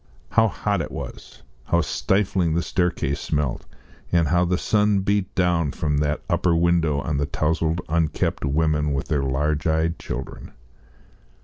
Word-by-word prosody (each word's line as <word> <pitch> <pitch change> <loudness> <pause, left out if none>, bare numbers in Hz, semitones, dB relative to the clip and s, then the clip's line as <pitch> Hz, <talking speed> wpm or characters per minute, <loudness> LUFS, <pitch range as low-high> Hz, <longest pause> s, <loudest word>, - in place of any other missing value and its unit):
How - - +4
hot - - -1
it - - -4
was! - - -9 0.2
how 85 +5 +2
stifling 90 +1 0
the 85 - +1
staircase 85 -5 -1
smelt, 75 -4 -2 0.4
and 85 -4 +3
how 85 +2 +3
the 90 +1 +1
sun 105 0 +2
beat 100 0 -1
down 85 -5 +2
from 75 -1 0
that 75 0 -1
upper 85 -2 +2
window 85 -3 +2
on 75 0 -2
the 70 - 0
towzled 80 +2 0
unkempt 80 -1 0
women 75 0 +1
with 70 - -3
their 75 -3 +1
large 75 +3 0
eyed 80 +1 +1
children. - - -7
80 Hz, 150 wpm, -23 LUFS, 75-85 Hz, 0.4 s, How